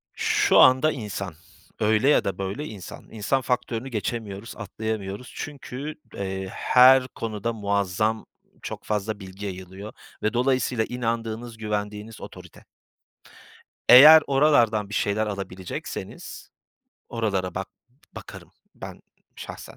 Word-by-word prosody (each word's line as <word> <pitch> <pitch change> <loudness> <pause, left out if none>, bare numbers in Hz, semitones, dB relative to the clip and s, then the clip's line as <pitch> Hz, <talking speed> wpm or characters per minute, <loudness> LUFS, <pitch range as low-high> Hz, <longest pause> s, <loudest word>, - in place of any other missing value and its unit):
Şu - - +3
anda, 130 +4 +6
insan 105 - -5 0.5
öyle 110 +5 +3
ya 150 - +4
da 100 - -3
böyle 100 +10 -4
insan. 100 - -10
İnsan 115 +5 0
faktörünü 125 0 -2
geçemiyoruz, 110 -2 -4
atlayamıyoruz. 110 0 -5
Çünkü, 145 0 -6 0.2
eee, 95 -1 -4
her 130 +3 +5
konuda 115 -2 -4
muazzam 100 +1 -1 0.4
çok - - -7
fazla 105 0 -2
bilgi 95 +1 -9
yayılıyor 95 +2 -8 0.3
ve 110 - +1
dolayısıyla 125 -1 +1
inandığınız, 115 -1 -3
güvendiğiniz 105 0 -4
otorite. - - -12 1.2
Eğer 155 +5 +10
oralardan 120 -7 +3
bir 105 - -7
şeyler 105 +2 0
alabilecekseniz 95 -3 -7 0.6
oralara 100 -6 -2
bak 95 +1 -4 0.5
bakarım - - -11 0.2
ben - - -9 0.4
şahsen, - - -9
110 Hz, 110 wpm, -25 LUFS, 100-125 Hz, 1.2 s, Eğer